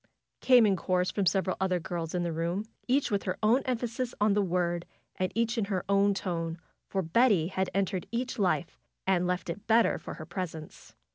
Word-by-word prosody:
came 250 -3 +6
in 200 -2 +3
chorus 180 0 0
from 200 -3 0
several 185 +2 +1
other 185 -1 +1
girls 170 -1 -4
in 175 - 0
the 170 -1 -2
room; 170 +5 -2 0.2
each 265 0 +2
with 200 -1 +1
her 185 -1 -3
own 235 +5 +4
emphasis 245 0 -2
on 210 0 +3
the 205 - +3
word, 175 -2 0 0.3
and 185 -1 -1
each 230 +1 +1
in 210 - +1
her 190 -3 -2
own 200 +1 +4
tone, 165 -3 -3 0.3
for 190 -1 -1
Betty 185 -1 +3
had 190 -1 -1
entered 190 -2 -1
each 245 +1 -3
life 180 -3 0 0.3
and 180 -2 +2
left 180 -1 -2
it 185 +5 -6
better 230 +1 +4
for - - -7
her 155 - -8
presence. 165 -3 -7
190 Hz, 200 wpm, -29 LUFS, 175-215 Hz, 0.3 s, came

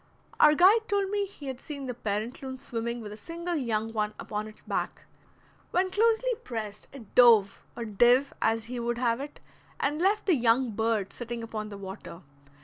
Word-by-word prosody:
Our 300 0 +7
guide 415 +7 +5
told 400 -1 0
me 405 -1 0
he 335 -7 -12
had 265 -2 -5
seen 280 -3 -7
the 250 - -3
parent 220 +1 -3
loon 260 -1 -6
swimming 235 -1 -4
with 210 -2 -7
a 210 - -8
single 340 +8 -5
young 225 -5 -1
one 210 -1 -1
upon 210 0 -4
its 215 - -13
back. - - -3 0.7
When 370 +1 +1
closely 455 +4 +2
pressed 215 -3 -6
it 250 -7 -12
dove, 225 -5 +6 0.2
or 235 - -3
"div" 240 +6 +4
as 225 0 +1
he 245 +1 -5
would 235 0 -1
have 240 -1 +1
it, 290 +1 -8 0.4
and 295 +3 0
left 405 +3 +2
the 375 - +4
young 245 -2 +3
bird 220 -2 -1
sitting 240 -1 -5
upon 215 -2 -5
the 200 - -8
water. 190 -3 -9
240 Hz, 190 wpm, -28 LUFS, 220-300 Hz, 0.7 s, Our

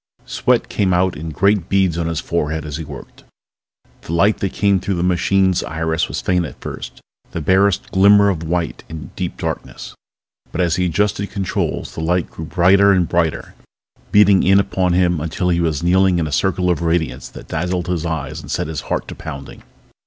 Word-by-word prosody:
Sweat - - +1
came 95 -3 +1
out 90 0 +1
in 80 +2 -6
great 100 +2 +1
beads 95 -4 +2
on 85 -1 -2
his 80 -2 -2
forehead 80 -2 -2
as 75 -1 -5
he 80 - -5
worked. 70 -3 -11 0.8
The 80 - -6
light 100 +6 +3
that 95 - -1
came 100 -1 +2
through 95 +1 -2
the 85 - -1
machine's 90 +1 +2
iris 80 +1 -1
was - - -4
faint 90 -1 +1
at 80 - -8
first, - - -8 0.3
the - - -2
barest 95 +4 +2
glimmer 100 +1 +6
of 85 -5 -2
white 85 0 -2
in 80 -1 -8
deep - - -4
darkness. - - -5 0.6
But - - -5
as 85 -1 +1
he 90 0 +1
adjusted 100 +3 0
controls 95 -2 -3
the - - -5
light 85 +1 0
grew 80 - -7
brighter 95 +4 +4
and 90 -3 +2
brighter, 85 -2 -1 0.6
beating 100 -2 +6
in 95 +1 +5
upon 95 -2 0
him 90 -2 +2
until 85 +3 -2
he 85 -1 +2
was 80 -2 -1
kneeling 95 +1 +3
in 85 - 0
a 75 - -4
circle 90 +3 +1
of 85 - -1
radiance 85 -3 -1
that - - -12
dazzled 90 +2 -2
his 90 -3 -2
eyes 80 -2 -4
and - - -12
set - - -1
his 75 -1 -4
heart - - -2
to - - -6
pounding. 70 0 -9
90 Hz, 195 wpm, -19 LUFS, 80-95 Hz, 0.8 s, glimmer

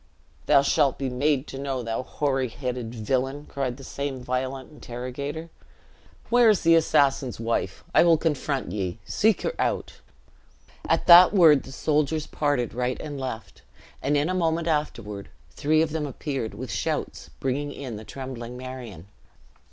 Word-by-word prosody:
"Thou 140 - +6
shalt 140 -1 +2
be 135 -2 -3
made 140 +2 +1
to 135 - -8
know, 135 -2 -3
thou 115 +1 -2
hoary 135 -1 -1
headed 125 -1 -5
villian!" 130 +6 -1
cried 130 -4 -3
the 135 - -11
same 140 -1 -4
violent 130 +1 -3
interrogator. 140 +4 -6 0.8
"Where 240 -1 +6
is 210 - +3
the 165 0 +5
assassin's 140 -6 +2
wife? 115 -5 -2
I - - +6
will 170 -2 +5
confront 145 -4 -1
ye. 95 -4 -3
Seek 215 0 +2
her - - -1
out." - - -2 0.9
At - - +2
that 180 +3 +9
word 160 -7 +7
the 135 - -12
soldiers 150 +2 0
parted 145 -5 -1
right 125 +1 -2
and 145 -2 -6
left, 125 -4 -6 0.4
and 145 +2 +1
in 145 +2 +1
a 185 - -1
moment 165 -2 0
afterward 115 -10 -2 0.2
three 155 +1 +2
of 160 - -3
them 155 -1 -2
appeared, 135 -4 -4
with 125 -2 -6
shouts, 95 - -3
bringing 140 +2 -2
in 130 -6 -6
the 110 - -9
trembling 125 -1 -7
Marion. 125 -9 -8
135 Hz, 160 wpm, -25 LUFS, 125-150 Hz, 0.9 s, that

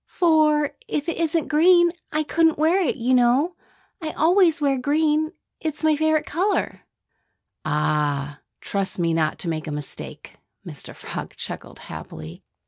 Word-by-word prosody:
"For 305 -4 +3 0.2
if 295 +1 -2
it 335 - -2
isn't 330 -1 0
green, 345 +3 +5 0.2
I 310 +1 0
couldn't 325 +1 +2
wear 325 +6 +3
it, 350 - 0
you 255 -1 0
know. 255 +8 +3 0.5
I 315 - -3
always 345 0 +4
wear 280 -2 +2
green. 305 +3 +1 0.3
It's 315 -1 -4
my 310 -1 +4
favorite 315 0 +1
color." 380 +6 -1 0.8
"Ah! 150 -2 0 0.2
Trust 195 -1 -2
me 170 -2 +1
not 155 -1 0
to - - -4
make 160 -2 -3
a - - -3
mistake!" 145 -1 -7 0.3
Mr. - - -9
Frog - - -7
chuckled - - -7
happily. 80 +1 -9
300 Hz, 145 wpm, -23 LUFS, -, 0.8 s, green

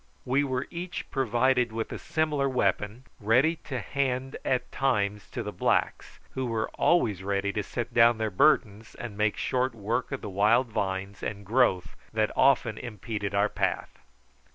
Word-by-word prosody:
We 135 +3 +2
were 130 -2 -2
each 175 +1 -5
provided 125 -1 +2
with 110 0 -4
a - - -5
similar 150 -3 0
weapon, 105 -1 0 0.2
ready 130 +10 +3
to 130 -4 -3
hand 130 +3 -2
at 125 - -1
times 105 -6 0
to - - -4
the - - -4
blacks, - - -1
who 130 -1 -3
were 115 -1 -1
always 110 - +2
ready 100 +1 -1
to 105 - -1
set 115 +3 -5
down 115 0 +5
their 110 -1 -1
burdens 110 -1 +2
and 115 -4 -7
make 105 0 +1
short 130 -1 0
work 115 +5 -2
of 135 - -4
the - - -6
wild 105 +6 +3
vines 95 -1 -3
and 100 -1 -5
growth 105 -5 +2 0.2
that 110 -1 +1
often 125 -5 +3
impeded 110 -4 -4
our 100 +1 +3
path. - - -2
115 Hz, 165 wpm, -27 LUFS, 105-130 Hz, 0.2 s, down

